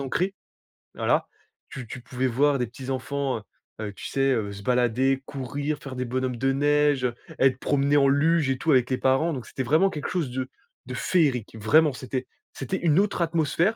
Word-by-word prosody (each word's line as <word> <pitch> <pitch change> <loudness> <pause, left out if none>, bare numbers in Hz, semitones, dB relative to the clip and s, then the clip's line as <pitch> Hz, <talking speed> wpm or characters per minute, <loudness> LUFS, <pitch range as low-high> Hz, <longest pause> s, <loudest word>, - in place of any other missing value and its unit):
ancré. 180 +8 -1 0.6
Voilà, - - +1 0.4
tu 130 -3 -7
tu 130 - -8
pouvais 125 +2 -2
voir 140 +3 +2
des 125 - +1
petits 130 +3 -9
enfants, 135 -1 -2
heu, - - -16 0.4
heu, 100 - -7
tu - - -10
sais, 135 0 +1
heu, 105 -4 -1
se 100 0 -10
balader, 125 +2 +2
courir, 145 +2 -3
faire 135 -3 -8
des 125 0 -2
bonhommes 125 0 -2
de 135 +2 +1
neige, 145 -1 +2
heu, 120 -1 -1 0.2
être 130 -1 +3
promenés 140 +1 +2
en 140 -1 +5
luge 150 +2 +3
et 135 - +1
tout 160 +5 0
avec 125 -3 +4
les 130 - 0
parents. 135 +6 +2
Donc, 125 -5 -5
c'était 130 - -4
vraiment 155 +9 +3
quelque 150 - -4
chose 160 -9 -1
de 130 0 -3 0.4
de - - -5
féerique. 135 - +1
Vraiment, 150 +7 +4
c'était 130 0 -4 0.3
c'était 190 - -3
une 165 -1 +3
autre 200 -2 0
atmosphère, 170 +4 +1
135 Hz, 200 wpm, -25 LUFS, 125-150 Hz, 0.6 s, en